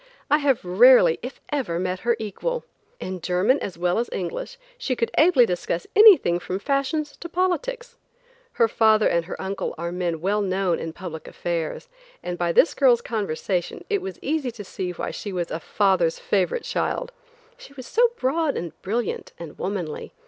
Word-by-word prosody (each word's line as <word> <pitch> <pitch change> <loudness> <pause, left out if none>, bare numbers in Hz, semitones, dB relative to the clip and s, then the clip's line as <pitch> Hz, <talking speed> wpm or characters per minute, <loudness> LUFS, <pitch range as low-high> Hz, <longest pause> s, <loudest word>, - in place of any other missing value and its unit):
I 295 - +5
have 275 -8 +1
rarely, 185 -2 +6
if 250 +3 -7
ever, 265 - -1
met 185 +1 -2
her 235 +3 +1
equal. 475 - -3 0.4
In 185 -1 -5
German 185 - +2
as 185 - -6
well 175 +3 +1
as 235 - -2
English, 185 - -5 0.2
she 260 - -1
could 230 -1 -1
ably 310 -7 +6
discuss 175 -3 -2
anything 400 - +7
from 185 +1 -4
fashions 280 +6 -1
to 340 - -8
politics. 475 +8 -2 0.5
Her 230 - +3
father 220 -1 +4
and 170 -1 +1
her 185 - -7
uncle 195 +1 -4
are 170 +1 -4
men 175 -2 -2
well 200 +5 0
known 190 -3 0
in 165 - -4
public 160 -2 -8
affairs, 170 - -4 0.4
and 180 - -3
by 175 -1 0
this 315 - +4
girl's 250 -4 +4
conversation 195 -4 -3
it 405 -2 +1
was 385 +1 -6
easy 290 -3 -1
to 225 -3 -8
see 185 -1 -4
that 180 - -5
she 205 - -6
was 175 -2 -3
a 160 - -3
father's 185 -3 +1
favorite 200 - 0
child; - - -2 0.4
she - - -15
was 260 -3 -9
so 475 - +3
broad 290 +3 0
and 170 -1 -4
brilliant 225 +2 -3
and 165 -3 -10
womanly. 185 -6 -4
205 Hz, 180 wpm, -24 LUFS, 175-280 Hz, 0.5 s, anything